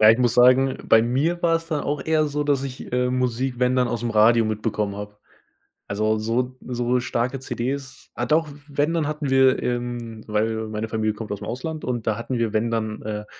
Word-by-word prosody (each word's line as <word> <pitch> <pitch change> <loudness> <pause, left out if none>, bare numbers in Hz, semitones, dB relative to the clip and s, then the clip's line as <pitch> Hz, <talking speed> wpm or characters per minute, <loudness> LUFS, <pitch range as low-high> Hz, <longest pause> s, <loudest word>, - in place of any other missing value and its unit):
Ja, 110 0 +9
ich 115 - +3
muss 120 -2 +2
sagen, 130 +2 +5
bei 110 - +5
mir 145 +9 0
war's 165 -1 +2
dann 155 -3 -2
auch 145 0 -2
eher 155 -1 +2
so, 145 +1 -2
dass 140 -2 +1
ich, 130 -3 -7
äh, 125 0 +1
Musik 125 0 -1
wenn 125 0 +2
dann 125 -1 +2
aus'm 120 0 -2
Radio 115 +2 +5
mitbekommen 105 -2 -2
habe. 105 0 -8 0.7
Also, 110 +2 +1
so 125 +4 -1
so 125 0 0
starke 125 +1 -1
CDs 130 +1 -5
ah 120 - -2
doch, 155 +4 +2 0.2
wenn 145 +2 0
dann 165 -3 0
hatten 150 -2 -3
wir 130 -1 +4
ähm, 120 -2 -3
weil 110 +1 -1
meine 110 +1 -4
Familie 110 -1 -1
kommt 110 0 -7
aus'm 105 0 -4
Ausland 155 +6 -4
und 120 -3 -2
da 110 - +1
hatten 120 +2 -3
wir 115 -2 0
wenn 110 +2 +1
dann, 110 -2 -2
äh, 105 0 -4
120 Hz, 205 wpm, -23 LUFS, 110-135 Hz, 0.7 s, Ja